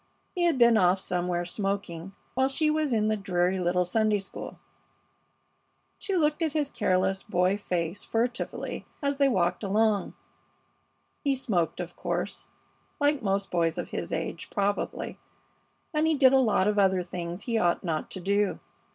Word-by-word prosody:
He 350 -1 +1
had 335 -5 +2
been 235 -2 +6
off 180 0 +4
somewhere 175 -1 -1
smoking 195 -2 -3 0.2
while 260 +1 +2
she 305 +3 +1
was 305 -2 0
in 215 -2 +2
the 215 - +2
dreary 185 -2 0
little 180 0 +1
Sunday 215 +3 +2
school. 195 -1 -7 1.4
She 395 - -2
looked 305 -2 +2
at 320 -3 0
his 295 -3 0
careless 190 +1 +1
boy 185 -1 +1
face 180 -3 -2
furtively 240 +2 -2 0.2
as 280 0 0
they 280 -1 +5
walked 175 -7 +1
along. 210 0 +1 1.1
He 280 -2 +2
smoked, 190 -12 -1
of 175 -1 -5
course, - - -3 0.5
like 290 -1 +2
most 195 -2 -1
boys 165 -1 +1
of 175 - -4
his - - -4
age, - - -3
probably, 200 -1 -2 0.7
and 305 +1 +2
he 320 - +3
did 270 -2 +6
a - - +7
lot 215 -6 +3
of 210 0 +2
other 190 -2 +3
things 175 +1 -5
he 230 -2 0
ought 175 -3 +1
not 160 -4 -2
to - - -6
do. 200 +2 +1
200 Hz, 160 wpm, -28 LUFS, 180-260 Hz, 1.4 s, a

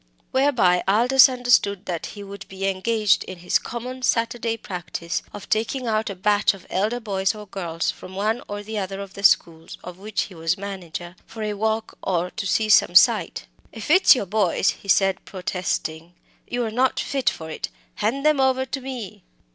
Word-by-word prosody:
Whereby 245 -10 +3
Aldous 245 +7 +6
understood 245 -6 +2
that 170 -3 -4
he 205 - -7
would 200 0 -10
be 195 0 -5
engaged 210 +2 +2
in 185 - -8
his 175 +1 +1
common 250 +2 -6
Saturday 230 -1 0
practice 175 -4 -5
of 205 - -9
taking 230 +4 -1
out 220 -1 0
a 200 - -5
batch 205 +2 +2
of 190 - -15
elder 215 +6 0
boys 195 -2 -1
or 210 0 -9
girls 170 -4 -3
from 190 - -12
one 215 +4 0
or 205 0 -5
other 195 -3 -4
of 200 -1 -8
the 200 - -8
schools 165 -4 +2
of 180 0 -9
which 205 0 -2
he 195 - -10
was 165 +2 -1
manager, 180 -3 -7
for 225 -1 -7
a 210 0 -2
walk 220 +2 -2
or 180 -1 -1
to 200 - -4
see 215 +4 +1
some 200 -4 +5
sight. 210 - +4 0.3
"If 225 +6 -5
it's 370 -3 +7
your 225 - -2
boys," 195 -1 +1
he - - -14
said, 195 0 +3
protesting, 175 -3 -4 0.3
"you're 240 -2 -2
not 255 +3 +1
fit 275 -2 0
for 160 0 -8
it. - - -4 0.3
Hand 270 +7 -1
them 305 -2 +4
over 260 0 +2
to 270 +1 -5
me." 250 -6 -7
205 Hz, 185 wpm, -23 LUFS, 185-230 Hz, 0.3 s, it's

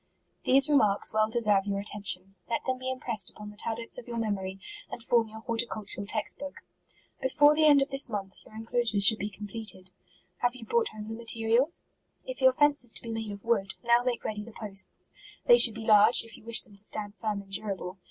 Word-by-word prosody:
These 270 +1 +5
remarks 215 -11 +4
well 215 0 +2
deserve 210 -4 +2
your 200 0 -1
atten 210 0 -3
tion. 185 0 +3 0.2
Let 230 - -2
them 255 -1 -2
be 260 0 -4
impressed 240 -5 -3
upon 210 0 -11
the - - -16
tab 225 +1 -3
lets 235 +1 -5
of 250 - -13
your 235 -1 -5
memory, 195 -4 -3 0.3
and 235 - -8
form 235 -1 +2
your 220 0 -11
horti* 230 +1 -1
cultural 205 -2 -4
text 215 0 -2
book. 285 -1 -7 0.7
Before 290 +3 +4
the 310 +1 +2
end 290 -2 +6
of 275 - -9
this 275 -1 +3
month, 195 -3 -5
your 215 - -17
inclo 225 +2 -2
sures 215 -4 0
should 220 +1 +6
be 205 - -3
completed. 205 -2 -6 0.5
Have 245 +4 0
you 245 -3 -11
brought 470 - +1
home 215 -1 -8
the 220 - -6
materials? 230 +5 +1 0.4
If - - -7
your 260 0 +6
fence 290 0 +3
is 240 - -6
to - - -8
be 230 - -6
made 225 -1 -4
of 200 -1 -9
wood, 200 -5 0
now 235 0 +4
make 250 -1 -2
ready 210 -1 -4
the 230 - -12
posts; 195 -3 -5 0.3
they 485 -1 +7
should 230 -2 +8
be 225 0 -7
large, 215 +2 +6
if 230 0 -12
you - - -16
wish 230 0 +4
them 230 - -22
32 200 - -17
MARCH. - - -16
to 210 - -11
stand 205 -1 -5
firm 210 -2 -2
and 195 - -22
durable. 195 -2 -4
225 Hz, 240 wpm, -28 LUFS, 205-245 Hz, 0.7 s, should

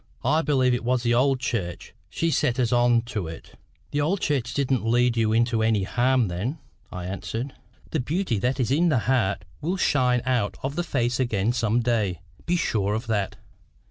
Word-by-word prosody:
I 155 - +3
believe 130 -4 +2
it 120 - -1
was 125 0 +1
the 120 -1 +2
old 130 +2 +3
church 100 -9 -3 0.2
she 165 0 -1
set 135 -5 +1
us 120 -3 +1
on 120 -1 +3
to 110 -7 -4
it." 80 0 -9 0.4
"The 145 - 0
old 180 +7 +1
church 135 -8 -1
didn't 135 -4 +1
lead 120 +1 +2
you 110 -2 +2
into 115 0 +2
any 110 -3 +2
harm 125 +3 +2
then," 100 - -3 0.3
I 90 -1 -6
answered. 115 +7 -4 0.4
"The 160 - 0
beauty 145 - -1
that 125 +5 0
is 125 -1 0
in 170 +5 +3
the 140 - +3
heart 120 -7 +1 0.2
will 180 +5 -1
shine 125 -8 +2
out 125 -5 0
of 140 +2 -3
the 175 - 0
face 125 -6 -1
again 115 -3 +1
some 115 -1 +1
day 110 -7 0 0.3
be 175 - +2
sure 105 - 0
of 110 +3 -3
that. 105 -4 -1
120 Hz, 195 wpm, -25 LUFS, 110-135 Hz, 0.4 s, I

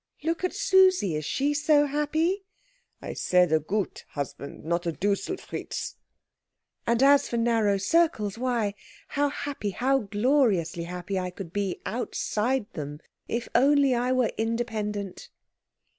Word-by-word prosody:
"Look 330 +3 -1
at 365 - -1
Susie 375 - +4
is 150 -1 -3
she 285 - 0
so 295 0 +4
happy?" 315 +7 0 0.6
"I - - -4
said 180 -2 +3
a 160 - +4
good 195 +6 -2
husband; 140 0 -6
not 170 +1 -1
a - - +1
Duselfritz." 200 - -3 0.9
"And 235 +2 +3
as 280 0 +5
for 235 - -1
narrow 225 -3 +2
circles, 210 - +2
why, 235 -4 0 0.4
how 290 +1 +1
happy, 280 -6 -4
how 265 +7 +1
gloriously 205 - +1
happy, 180 +2 -3
I 180 0 -2
could 180 -1 -9
be 200 -3 -2
outside 245 0 -1
them, 145 -1 -6 0.3
if 235 0 -2
only 280 0 +4
I 245 +1 +1
were 255 -2 +2
independent!" 215 -4 -3
230 Hz, 135 wpm, -27 LUFS, 195-285 Hz, 0.9 s, as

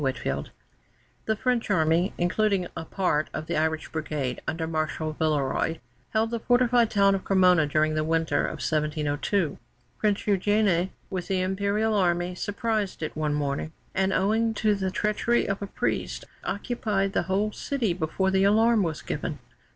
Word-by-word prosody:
CREMONA 70 - -1 0.8
[The 220 - +1
French 245 +1 0
Army, 170 +1 +2
including 195 +1 +1
a 165 - -5
part 170 -6 0
of 155 - -4
the 170 - -2
Irish 160 0 0
Brigade, 150 -5 -3
under 160 0 -2
Marshal 155 -1 -2
Villeroy, 155 0 0 0.3
held 225 +1 0
the 235 - -1
fortified 245 -1 +3
town 200 -1 +4
of 195 - -2
Cremona 180 -5 +4
during 155 +1 +2
the 155 0 0
winter 160 0 +1
of - - -5
1702. 150 +3 0 0.4
Prince 210 -2 +1
Eugène, 200 -2 +2 0.2
with 185 -2 -3
the 190 -2 0
Imperial 200 +4 0
Army, 175 -2 +1
surprised 205 -1 -2
it 155 - -4
one 155 -1 0
morning, 145 +2 -2 0.2
and, 190 0 +1
owing 220 +4 +1
to 215 0 +2
the 190 -2 -1
treachery 210 +5 +1
of 195 +1 -2
a 200 - -3
priest, - - -2 0.2
occupied 200 -1 -1
the - - +2
whole 205 +3 +1
city 240 -6 -1
before 185 +3 -1
the 190 0 +3
alarm 220 +2 +4
was 165 -5 -2
given. - - -3
190 Hz, 160 wpm, -26 LUFS, 160-210 Hz, 0.8 s, town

